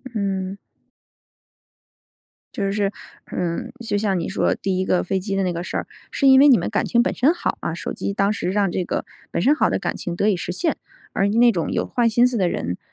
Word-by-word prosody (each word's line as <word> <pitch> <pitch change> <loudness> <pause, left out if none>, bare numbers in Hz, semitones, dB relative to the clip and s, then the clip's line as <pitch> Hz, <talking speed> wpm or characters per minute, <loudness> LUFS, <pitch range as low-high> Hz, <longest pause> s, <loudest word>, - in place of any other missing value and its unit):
嗯。 195 -2 -2 2.0
就 195 -1 -1
是 200 -1 0 0.4
嗯， 170 -2 -3
就 205 - 0
像 200 -3 0
你 165 - -3
说 190 - +1
第 190 -1 -2
一 190 - 0
个 180 - +1
飞 190 +1 -1
机 195 +1 -3
的 195 - +1
那 180 -1 0
个 170 +1 -4
事 - - -3
儿， - - -4 0.2
是 275 - +2
因 265 0 +8
为 285 - +7
你 265 -4 +7
们 - - -2
感 210 - 0
情 235 - +3
本 - - 0
身 285 +7 +3
好 355 - -2
啊， - - -2
手 - - -4
机 200 - -3
当 200 +1 +1
时 185 - -2
让 200 -2 +1
这 185 - -1
个 - - -3 0.3
本 - - -1
身 285 +8 +4
好 - - +2
的 - - -1
感 - - -2
情 175 - -4
得 200 - +1
以 205 - +2
实 180 - -4
现。 320 - -1 0.4
而 195 - +2
那 235 +3 +5
种 170 -6 -2
有 - - 0
坏 240 -1 +1
心 240 +2 +4
思 250 -2 -2
的 185 - +2
人， 90 +1 -3
200 Hz, 255 characters per minute, -22 LUFS, 185-230 Hz, 2.0 s, 因